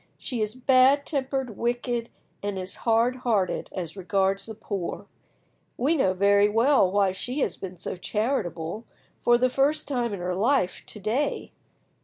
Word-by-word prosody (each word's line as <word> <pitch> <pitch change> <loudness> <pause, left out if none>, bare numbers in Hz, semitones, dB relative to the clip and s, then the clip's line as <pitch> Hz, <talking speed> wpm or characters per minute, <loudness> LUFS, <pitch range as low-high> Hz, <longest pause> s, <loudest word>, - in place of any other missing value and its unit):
She 245 -4 -3
is 215 +2 -1
bad 260 +2 +4
tempered, 265 -5 -2
wicked, 240 0 -2 0.3
and 205 -1 -3
is 185 0 -6
hard 235 +3 +3
hearted 220 -7 0
as 175 -2 -5
regards 195 +1 0
the 220 - -7
poor. 200 -4 -5 0.7
We 285 +7 +2
know 190 -11 +2
very 200 +2 +4
well 225 -2 +4
why 200 -1 +3
she 250 +9 -3
has - - 0
been 185 -1 -8
so - - -5
charitable, 210 -2 -2 0.4
for 240 0 +5
the 255 +1 +3
first 275 +4 +1
time 245 -5 -1
in 200 - -4
her 180 +1 -2
life, 210 0 +1
to 215 - -6
day. 225 +9 -1
225 Hz, 160 wpm, -26 LUFS, 195-255 Hz, 0.7 s, for